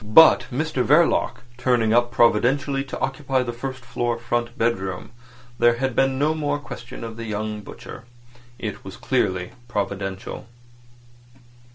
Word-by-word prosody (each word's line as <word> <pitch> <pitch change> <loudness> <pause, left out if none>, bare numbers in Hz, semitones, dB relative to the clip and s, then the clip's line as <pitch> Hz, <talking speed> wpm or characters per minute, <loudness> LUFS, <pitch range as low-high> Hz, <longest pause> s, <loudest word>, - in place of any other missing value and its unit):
But 110 +10 +7
Mr 140 0 0
Verloc, 145 -6 +3 0.2
turning 120 -3 +2
up 120 0 +4
providentially 135 +5 +3
to 135 - -6
occupy 135 -1 0
the 120 -1 -4
first 130 +1 -6
floor 120 -1 -1
front 120 0 -2
bedroom, 95 -4 -1 0.5
there 120 0 +5
had 130 0 -2
been 135 0 +2
no 150 +3 +2
more 145 -2 -1
question 120 -5 -9
of 115 -1 -7
the 115 - -5
young 105 0 -3
butcher. 115 - -10 0.5
It - - -5
was - - -9
clearly 95 -1 0 0.2
providential. 100 -2 -4
120 Hz, 140 wpm, -23 LUFS, 110-135 Hz, 0.5 s, But